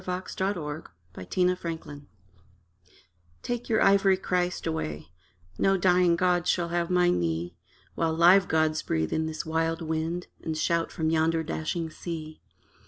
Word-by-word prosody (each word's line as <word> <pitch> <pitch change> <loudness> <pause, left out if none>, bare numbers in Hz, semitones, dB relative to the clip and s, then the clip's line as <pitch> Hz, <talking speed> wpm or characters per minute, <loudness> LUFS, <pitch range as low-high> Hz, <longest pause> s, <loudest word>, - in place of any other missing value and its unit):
THE - - -20
DYING 180 0 -2
PANTHEIST - - -14 0.9
TO 180 - +2
THE 180 0 +3
PRIEST 160 -4 -6 1.4
Take 240 0 -4
your 220 - +3
ivory 195 -1 +4
Christ 180 -1 -1
away: 80 - -4 0.5
No 195 0 +3
dying 180 -1 +4
god 175 0 +1
shall 170 -1 +1
have 170 0 -1
my 180 -1 +3
knee, 85 - -1 0.4
While 160 -1 0
live 180 +3 +6
gods 155 -1 +1
breathe 80 -1 -1
in 160 0 0
this 160 0 -5
wild 165 +1 -1
wind 160 +2 -2 0.2
And 160 -1 -3
shout 165 +1 0
from 160 -1 -1
yonder 160 0 +2
dashing 160 +1 -3
sea. 155 -2 -7
165 Hz, 150 wpm, -27 LUFS, 160-180 Hz, 1.4 s, live